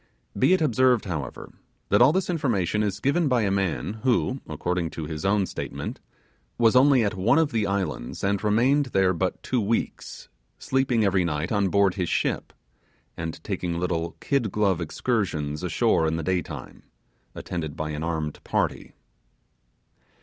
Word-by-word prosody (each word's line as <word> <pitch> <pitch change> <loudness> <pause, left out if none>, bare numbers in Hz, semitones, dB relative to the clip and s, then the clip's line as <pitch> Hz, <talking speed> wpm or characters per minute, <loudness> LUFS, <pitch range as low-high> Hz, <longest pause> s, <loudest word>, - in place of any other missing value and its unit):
Be - - +4
it 185 - +2
observed, 125 -4 +3
however, 80 -9 -5 0.4
that - - +4
all 125 +4 +7
this 185 +2 0
information 115 - 0
is 105 -1 -1
given 155 +4 +1
by 125 -4 +2
a 100 - +1
man 100 +2 -1
who, 130 +1 +1
according 85 +2 -2
to 80 -1 -6
his 75 0 -5
own 100 0 +2
statement, - - -6 0.6
was 115 0 +4
only 130 -1 +6
at 105 0 0
one 110 +8 +2
of 160 -2 +2
the 110 -3 0
islands, 95 -11 -3
and 100 +1 0
remained 125 +7 +3
there 95 -5 +2
but 90 +2 -2
two 125 -2 0
weeks, 110 +3 -3 0.3
sleeping 130 -4 +1
every 95 -2 +2
night 80 0 -2
on 100 -2 +2
board 100 -1 +3
his 90 -3 -2
ship, - - -1 0.6
and 80 -1 -6
taking 90 -4 -3
little 85 -2 -2
kid 125 -8 0
glove 100 -4 +1
excursions 80 - -2
ashore 80 - +2
in 80 - 0
the 80 - -3
daytime, 90 +1 -3 0.5
attended 80 -4 -5
by 75 0 -3
an 75 0 -4
armed 80 -2 -3
party. - - -2
100 Hz, 160 wpm, -25 LUFS, 85-120 Hz, 0.6 s, all